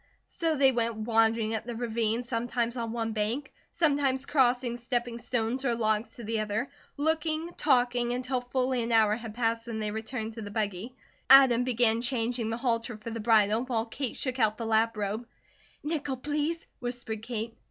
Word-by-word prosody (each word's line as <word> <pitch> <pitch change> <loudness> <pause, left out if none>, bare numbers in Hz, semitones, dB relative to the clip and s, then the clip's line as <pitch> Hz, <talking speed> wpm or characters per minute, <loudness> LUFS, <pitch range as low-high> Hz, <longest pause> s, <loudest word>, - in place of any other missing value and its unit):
So 330 -3 -1
they 270 -2 +5
went 235 -2 0
wandering 225 0 +2
up 220 - -2
the 240 -1 -5
ravine, 230 0 -1
sometimes 235 0 -2
on 230 -2 -3
one 225 -1 -2
bank, 225 +6 -2 0.2
sometimes 280 -5 +1
crossing 245 -4 +2
stepping 240 -1 -2
stones 240 +2 -1
or 240 -3 +1
logs 220 0 0
to 240 - -9
the 225 +1 -1
other, 215 +4 -2 0.3
looking, 315 +2 0
talking, 245 -3 +2
until 255 +1 -1
a - - -10
full 255 +1 -1 0.2
hour 220 -2 +4
had 225 -2 -8
passed 230 -1 0
when 230 -2 -4
they 215 -1 -2
returned 220 +1 -4
to 225 - -7
the 205 - -6
buggy. 210 +3 -3 0.3
Adam 260 -3 +8
began 235 -2 +3
changing 240 -2 0
the 225 - -2
halter 235 -2 -1
for 215 +2 -7
the 230 - -4
bridle 215 0 +4
while 230 -3 -1
Kate 250 +2 -4
shook 255 -1 -2
out 215 -2 +2
the 230 - -4
lap 225 0 +2
robe. 210 +3 -3 0.6
"Nickel, 290 -3 -2
please," 300 +5 -2
whispered 240 -3 -4
Kate. 225 -1 -5
235 Hz, 180 wpm, -29 LUFS, 225-255 Hz, 0.6 s, Adam